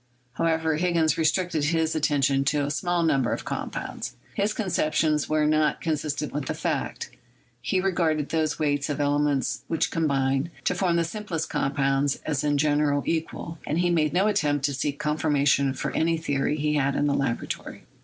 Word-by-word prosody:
However, 160 0 +1
Higgins 170 -2 +2
restricted 160 -1 +1
his 160 0 +1
attention 140 -3 +2
to 145 0 +1
a 145 - -2
small 175 +3 0
number 140 -6 +2
of - - -5
compounds. - - -5 0.2
His 205 +1 0
conceptions 155 -7 0
were 155 0 +2
not 155 0 +2
consistent 150 -2 -2
with 145 -1 -3
fact; - - -3 0.5
he 135 +10 0
regarded 170 -6 0
those 160 -1 0
weights 145 -1 0
of 145 - -2
ele 145 0 +2
ments 145 -2 0
which 165 - 0
combine 135 -2 +1
to - - +1
form 180 -1 +1
the 170 - +2
simplest 170 -3 -4
compound 135 0 +1
as 145 -3 -1
in 145 -1 +2
general 145 -1 +2
equal; 165 0 -3
and 155 - 0
he 175 0 +2
made 155 -3 +2
no 185 +4 +2
attempt 150 -10 +1
to 140 - 0
seek 140 +1 -2
confirma 150 -1 0
tion 140 -1 +3
for - - -3
any 165 +1 +1
theory 145 -2 -1
he 150 0 0
had 140 -2 +1
in 145 - +1
the 145 - +2
laboratory. 135 -4 -3
150 Hz, 175 wpm, -25 LUFS, 145-165 Hz, 0.5 s, tion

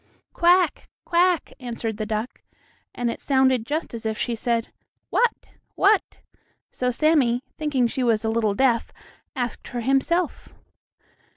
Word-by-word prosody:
"Quack! 350 0 +3 0.2
quack!" 350 -1 +2
answered 230 -3 -4
the 215 -1 -3
duck, 220 +2 -4 0.5
and 240 -1 -1
it - - -8
sounded 260 -4 +2
just 310 0 -3
as 230 - -6
if 220 -1 -2
she 240 - -1
said, 230 0 -1 0.4
"What? 480 -1 +1 0.3
what?" 405 0 +2 0.5
So 250 - -1
Sammie, 255 -3 +2 0.2
thinking 290 -5 +1
she 260 +3 -2
was 230 -3 +1
a - - +1
little 220 -2 +1
deaf, 240 -1 +2 0.4
asked 245 -4 -4
her 245 - -4
himself. 275 +7 0
250 Hz, 135 wpm, -24 LUFS, 230-305 Hz, 0.5 s, Quack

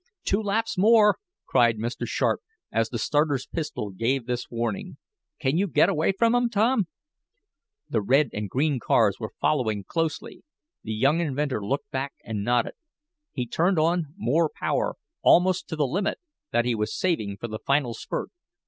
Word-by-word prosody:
"Two 200 +3 +1
laps 215 -1 -1
more!" 210 0 +6 0.3
cried 120 -3 +3
Mr. 115 +2 -3
Sharp, - - 0 0.3
as 115 0 +1
the 120 - -3
starter's 145 +2 +1
pistol 150 -10 -4
gave 115 +6 -1
this 125 0 -3
warning. 165 - -3 0.4
"Can 150 +2 +1
you 200 - +2
get 190 - +4
away 165 -1 +2
from 230 +4 +2
'em, 245 -1 +2
Tom?" 220 -2 +2 1.0
The 110 - 0
red 135 +8 +3
and 105 - -3
the - - -8
green 140 +4 +1
cars 110 -4 +2
were 110 -2 -6
following 110 -9 +1
closely. 165 - -3 0.4
The 110 - -4
young 140 +9 +3
inventor 140 -7 -1
looked 140 - -3
back 135 +1 -3
and 105 -2 -3
nodded. 120 +1 +1 0.6
He 125 - -3
turned 175 +9 +1
on 160 -1 +1
more 160 0 +2
power, - - -1 0.3
almost 185 0 +4
to 160 - -4
the 150 -2 +1
limit 190 +10 -1 0.3
that 120 - +2
he 125 - +1
was 105 -1 -2
saving 110 - -1
for 120 - -5
the 110 -1 -6
final 140 -4 +1
spurt. - - -4
140 Hz, 170 wpm, -26 LUFS, 115-180 Hz, 1.0 s, more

